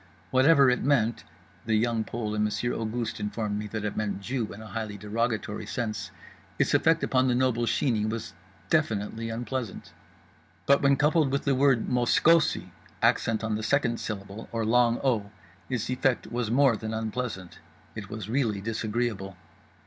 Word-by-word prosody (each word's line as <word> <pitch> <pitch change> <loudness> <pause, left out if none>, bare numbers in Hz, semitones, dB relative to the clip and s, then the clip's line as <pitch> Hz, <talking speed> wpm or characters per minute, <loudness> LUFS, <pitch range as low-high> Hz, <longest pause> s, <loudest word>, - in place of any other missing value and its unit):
Whatever 135 +2 +6
it 125 - 0
meant 120 -5 +1 0.4
(The 110 - +2
Young 115 0 +1
Pole 110 -2 -4
and 105 0 +1
Monsieur 105 +3 -1
Auguste 115 0 -3
informed 105 0 -2
me 105 - -4
that 105 0 -4
it 105 - -3
meant 105 -2 -2
"Jew" 115 +2 -3
in 100 - -9
a 110 - -9
highly 110 -1 -5
derogatory 105 0 -2
sense) 110 -4 -3 0.5
its - - +1
effect - - +3
upon 130 0 +2
the 125 - +2
noble 120 -2 +1
Sheeney 115 -2 +1
was 115 0 -5 0.4
definitely 110 +2 0
unpleasant. 120 -1 -5 0.7
But 140 0 +4
when 140 0 +4
coupled 150 +1 +3
with 140 - 0
the 140 - +2
word 130 -3 +3
"moskosi," 145 +6 +3 0.3
accent 115 -1 +2
on 110 -1 -1
the 105 - -2
second 120 -1 +1
syllable 100 0 -6
or 115 -1 -1
long 120 +1 +3
o, 115 -7 +1 0.4
its 125 -4 -2
effect 130 0 0
was 120 -2 -1
more 130 0 +4
than 110 +1 -4
unpleasant—it 110 -2 -6
was 110 -2 -6
really 115 -4 0
disagreeable. 110 -2 -2
115 Hz, 160 wpm, -27 LUFS, 105-125 Hz, 0.7 s, Whatever